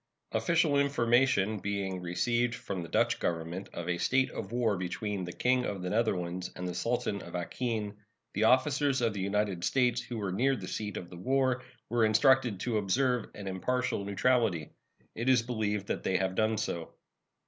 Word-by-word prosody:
Official 145 +5 +2
information 120 -6 +2
being 95 -1 -2
received 120 +7 0
from 95 -6 -5
the 85 - -7
Dutch - - +2
Government 85 +3 -3
of 85 - -6
a 85 -1 -1
state 130 +6 +2
of 95 - -6
war 120 -3 +1
between 95 +2 -3
the 90 - -5
King 125 +6 +2
of 100 -5 -3
the 90 - -2
Netherlands 90 -5 0
and 90 - -4
the 90 - -3
Sultan 105 0 -1
of - - -9
Acheen, 105 +3 -2 0.4
the - - +2
officers 135 +2 +3
of 115 -3 +1
the 100 - -5
United 100 -2 0
States 125 0 +2
who 120 0 -6
were 100 -3 -2
near 130 +8 +2
the 95 -7 -7
seat 105 0 -4
of 85 - -7
the 90 - -9
war 130 +4 +1 0.3
were 120 -1 +1
instructed 120 0 +4
to 115 -3 0
observe 125 +4 +1
an 100 -1 -7
impartial 100 +3 -1
neutrality. 100 -5 +1 0.4
It 120 +3 -1
is 125 -3 +5
believed 105 -4 -1
that - - -2
they 95 - +1
have 95 -1 0
done 110 +2 +1
so. 85 -4 -4
110 Hz, 180 wpm, -30 LUFS, 95-125 Hz, 0.4 s, is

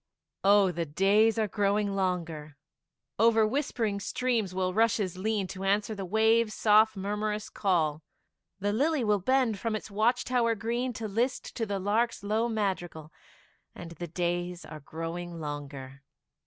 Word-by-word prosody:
Oh, 200 -1 +5
the 170 -1 -3
days 200 +8 +3
are 220 -1 +1
growing 205 0 0
longer; 165 -6 -3 0.6
Over 225 0 +5
whispering 225 -4 -1
streams 230 -2 -1
will 185 0 -1
rushes 210 -4 +1
lean, 205 +1 -1
To 190 0 -7
answer 205 +3 +1
the 195 -2 -5
waves' 220 +2 +3
soft 215 0 +4
murmurous 210 +2 -2
call; 160 -6 0 0.6
The 205 +1 0
lily 290 +4 +1
will 210 -2 +2
bend 245 0 +1
from 225 +1 -2
its 215 0 -6
watch 235 +5 +1
tower 235 -2 +1
green, 235 +4 -2
To 225 -1 -5
list 235 +6 -2
to 225 -2 -2
the 200 -1 -2
lark's 210 +4 0
low 220 +3 0
madrigal, 175 -8 -3 0.6
And 170 -1 -9
the 175 +1 -6
days 175 +1 -2
are 155 - -9
growing 165 +3 -6
longer. 140 -3 -7
205 Hz, 150 wpm, -29 LUFS, 175-225 Hz, 0.6 s, Oh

